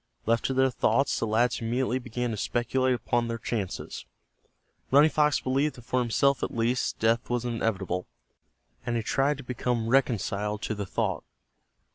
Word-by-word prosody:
Left 115 +1 +2
to 135 - +1
their 130 0 +3
thoughts, 135 +2 +1
the 115 - -1
lads 115 +4 +1
immediately 125 +2 0
began 125 -1 -3
to - - -2
speculate 125 +4 +1
upon 120 0 0
their 115 0 -3
chances. 110 -4 -4 0.8
Running 145 +3 +6
Fox 150 -1 +3
believed 135 +3 0
that 120 - -12
for 130 +2 0
himself 125 +2 +2
at - - -1
least 115 +2 0
death 115 +1 +1
was 120 0 -1
inevitable, 100 -6 -2 0.8
and 120 - -2
he 115 - -2
tried 140 +5 +1
to 140 - -9
become 120 -2 -2
reconciled 105 -5 0
to - - -1
the 100 -2 -4
thought. - - -1
120 Hz, 165 wpm, -27 LUFS, 115-130 Hz, 0.8 s, Running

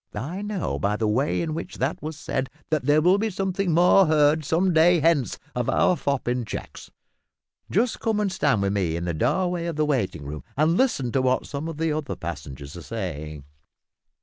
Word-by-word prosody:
"I 150 - -4
know 205 -3 -3
by 105 0 0
the 110 0 0
way 130 +10 +1
in 160 -2 -3
which 160 - -6
that 135 +5 -2
was 155 0 -5
said 135 -3 -3 0.2
that 155 -5 0
there 150 +1 +4
will 185 +3 +4
be 220 +1 0
something 190 -1 -1
more 180 +3 +5
heard 155 0 +3
some 175 +5 +1
day 170 +2 +5
hence 155 -5 +2 0.2
of 125 -1 -1
our 180 - +3
fop 140 -4 -2
in 125 0 0
checks. 110 - -7 0.8
Just 225 +5 +1
come 220 -2 0
and 205 -2 0
stand 140 - +1
with 100 0 0
me 90 -5 0
in 85 +1 -3
the 85 - -1
doorway 170 - 0
of 170 - -3
the 155 0 +1
waiting 100 - -1
room, 75 +1 -6
and 155 +3 +3
listen 180 - +1
to 135 - +1
what 130 0 +1
some 145 +2 -5
of 165 -2 -6
the 160 0 0
other 150 -1 -3
passengers 70 -3 -7
are 85 - -8
saying." 75 -8 -5
150 Hz, 205 wpm, -24 LUFS, 110-170 Hz, 0.8 s, more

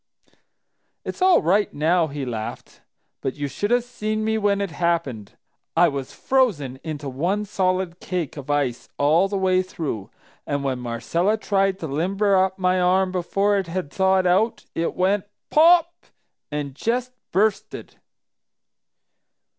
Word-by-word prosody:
"It's - - -6
all 370 -1 +5
right 200 +6 +2
now!" 165 +3 +2
he 140 -2 -5
laughed. 110 -3 -6 0.4
"But 130 - -3
you 145 -1 -3
should 205 +9 -3
have 245 0 +3
seen 215 -3 -3
me 220 0 +1
when 205 -1 +2
it 200 -3 -2
happened! 155 - -2 0.4
I 175 0 +6
was 140 -2 -5
frozen 170 - 0
into 150 -3 -5
one 175 +11 -1
solid 185 -3 -1
cake 180 -6 -3
of 140 -2 -9
ice 140 -4 -1
all 160 +6 +3
the 200 0 -2
way 185 -1 +2
through, 155 - -5 0.4
and 140 0 -1
when 130 -2 -1
Marcella 125 - 0
tried 195 -2 +1
to 160 - -3
limber 195 +8 +1
up 190 0 +2
my 185 -1 +2
arm 185 +1 +3
before 195 +3 +1
it 190 - -4
had 170 -3 -4
thawed 190 -1 +2
out, 195 +6 +2
it 165 - -2
went, 190 +2 +1 0.3
'Pop!' 340 +2 +4 0.4
and 145 -2 -3
just 245 - -1 0.2
bursted. 205 +3 -1
185 Hz, 145 wpm, -23 LUFS, 145-200 Hz, 0.4 s, I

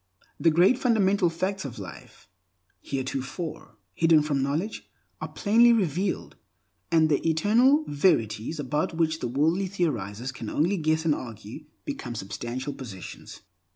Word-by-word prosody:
The 165 - +4
great 180 +10 +4
fundamental 200 -7 +3
facts 185 +4 -2
of 135 -5 -7
life, - - -11 0.5
heretofore 135 +1 -5 0.2
hidden 165 -2 +4
from 145 -2 0
knowledge, 155 +11 -2 0.3
are - - -3
plainly 230 +3 +4
revealed, 190 -2 -1 0.5
and 160 -1 +5
the 150 -2 +1
Eternal 240 - +4
Verities, 145 - +1
about 150 +4 -1
which 160 -1 +1
the - - -2
wordy 160 +10 +1
theorizers 130 - -2
can 115 -4 -7
only 175 +7 +1
guess 160 0 0
and 155 - +4
argue, 115 +3 -8 0.2
become 135 - -5
substantial 120 +7 -5
possessions. 105 -9 -9
155 Hz, 130 wpm, -26 LUFS, 135-185 Hz, 0.5 s, and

